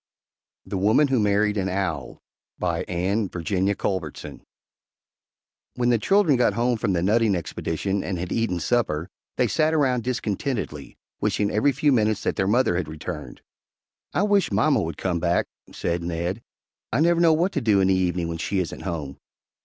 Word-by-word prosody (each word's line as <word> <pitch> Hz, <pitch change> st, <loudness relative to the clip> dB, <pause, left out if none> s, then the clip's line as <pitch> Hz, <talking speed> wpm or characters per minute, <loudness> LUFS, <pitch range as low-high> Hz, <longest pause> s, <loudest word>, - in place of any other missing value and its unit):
THE 95 Hz, -, -3 dB
WOMAN 110 Hz, +9 st, +4 dB
WHO 130 Hz, -2 st, +2 dB
MARRIED 105 Hz, 0 st, +2 dB
AN 95 Hz, -1 st, 0 dB
OWL 90 Hz, -7 st, -3 dB, 0.3 s
BY 85 Hz, -2 st, -1 dB
ANNE 95 Hz, +4 st, -1 dB
VIRGINIA 95 Hz, +3 st, -1 dB
CULBERTSON 90 Hz, -8 st, -4 dB, 1.3 s
When 125 Hz, -1 st, +1 dB
the 120 Hz, -, +3 dB
children 185 Hz, -, +3 dB
got 120 Hz, -4 st, +3 dB
home 120 Hz, +1 st, 0 dB
from 100 Hz, -4 st, 0 dB
the 85 Hz, -1 st, 0 dB
nutting 110 Hz, +1 st, +3 dB
expedition 95 Hz, +3 st, -2 dB
and 95 Hz, -1 st, -3 dB
had 90 Hz, +1 st, -5 dB
eaten 115 Hz, -6 st, 0 dB
supper, 85 Hz, -4 st, 0 dB, 0.3 s
they -, -, +3 dB
sat 155 Hz, 0 st, +1 dB
around 130 Hz, -6 st, +2 dB
discontentedly, 110 Hz, -, -3 dB, 0.2 s
wishing 105 Hz, -1 st, 0 dB
every 110 Hz, +7 st, +3 dB
few 145 Hz, +3 st, +2 dB
minutes 110 Hz, -4 st, +1 dB
that -, -, 0 dB
their 95 Hz, -, 0 dB
mother 105 Hz, -4 st, +2 dB
had 90 Hz, -4 st, -2 dB
returned. 80 Hz, 0 st, -7 dB, 0.7 s
"I 185 Hz, -, +1 dB
wish 205 Hz, -2 st, +2 dB
mamma 140 Hz, -6 st, +3 dB
would 80 Hz, -3 st, -4 dB
come 90 Hz, -2 st, -1 dB
back," 85 Hz, +1 st, +1 dB, 0.3 s
said 85 Hz, 0 st, -2 dB
Ned. 85 Hz, +5 st, -3 dB, 0.5 s
"I 115 Hz, -, +1 dB
never 170 Hz, +2 st, +3 dB
know 165 Hz, -2 st, +6 dB
what 175 Hz, +5 st, +1 dB
to 145 Hz, -, -1 dB
do 105 Hz, -4 st, +3 dB
in 95 Hz, 0 st, +3 dB
the -, -, +4 dB
evening 90 Hz, -2 st, 0 dB
when 85 Hz, 0 st, -4 dB
she 100 Hz, -, -2 dB
isn't 90 Hz, -3 st, -3 dB
home." 80 Hz, -7 st, -5 dB
100 Hz, 175 wpm, -24 LUFS, 90-120 Hz, 1.3 s, know